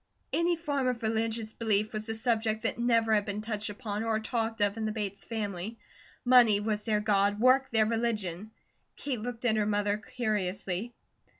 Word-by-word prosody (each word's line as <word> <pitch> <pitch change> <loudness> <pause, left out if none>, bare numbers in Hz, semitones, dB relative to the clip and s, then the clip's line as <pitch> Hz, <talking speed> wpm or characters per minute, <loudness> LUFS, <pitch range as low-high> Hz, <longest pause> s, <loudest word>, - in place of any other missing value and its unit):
Any 340 +1 +2
form 285 -5 -1
of 250 -2 -1
religious 220 0 -1
belief 215 -1 0
was 215 +1 -5
a 225 - -2
subject 220 -1 0
that - - -1
never 230 -2 +3
had 210 -1 +3
been 205 +1 -3
touched 215 -1 -3
upon 210 -1 -4
or 225 -1 +1
talked 225 0 -2
of 205 0 +2
in 225 -1 -3
the 215 - -1
Bates 205 -2 -4
family. 210 -1 -4 0.5
Money 240 -5 +6
was 210 0 -2
their 215 -2 +2
God, 205 -1 +2
work 260 +3 +4
their 220 -2 +3
religion; 215 -4 -2 0.5
Kate 255 -6 -3
looked 245 +1 -5
at 220 -2 +3
her 210 -1 +1
mother 205 0 +1
curiously. 210 -1 -3
220 Hz, 180 wpm, -30 LUFS, 210-230 Hz, 0.5 s, Money